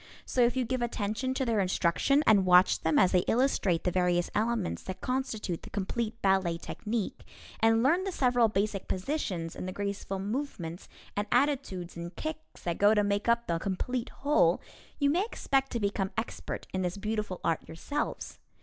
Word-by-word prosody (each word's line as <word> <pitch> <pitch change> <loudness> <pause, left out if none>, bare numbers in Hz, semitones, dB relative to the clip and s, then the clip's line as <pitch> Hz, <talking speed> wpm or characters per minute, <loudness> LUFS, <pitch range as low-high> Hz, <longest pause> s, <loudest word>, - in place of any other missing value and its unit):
So 255 - 0
if 240 +1 +4
you 255 -1 +1
give 255 +1 -2
attention 235 +2 -2
to 265 - 0
their 230 -3 +1
instruction 185 - +2
and 205 -3 +6
watch 180 0 +5
them 160 -2 +2
as 185 - +5
they 180 - +4
illustrate 225 -9 +2
the 180 - +1
various 175 -1 +1
elements 220 -2 0
that 185 - -6
constitute 240 -9 -2
the - - -11
complete 220 +3 -3
ballet 190 -3 +2
technique, 215 +4 -4 0.4
and 225 0 +4
learn 335 +8 +3
the 390 - -2
several 245 -7 +3
basic 200 -1 -1
positions 185 - -2
and - - -5
the - - -3
graceful 200 0 -3
movements 195 - -4 0.3
and 205 +1 -1
attitudes 245 -10 0
and 170 +1 -7
kicks 315 0 -7
that 170 -1 -2
go 205 +2 +6
to 210 - +3
make 205 +2 0
up 235 0 +3
the 170 -1 -1
complete 230 +8 -2
whole, 295 +2 +2 0.4
you 285 -1 +3
may 355 +6 +2
expect 270 - 0
to 235 - 0
become 200 -2 -1
expert 225 - -4
in 185 - 0
this 180 +1 -2
beautiful 210 -2 -3
art 165 - +1
yourselves. 285 - -4
210 Hz, 180 wpm, -30 LUFS, 185-250 Hz, 0.4 s, and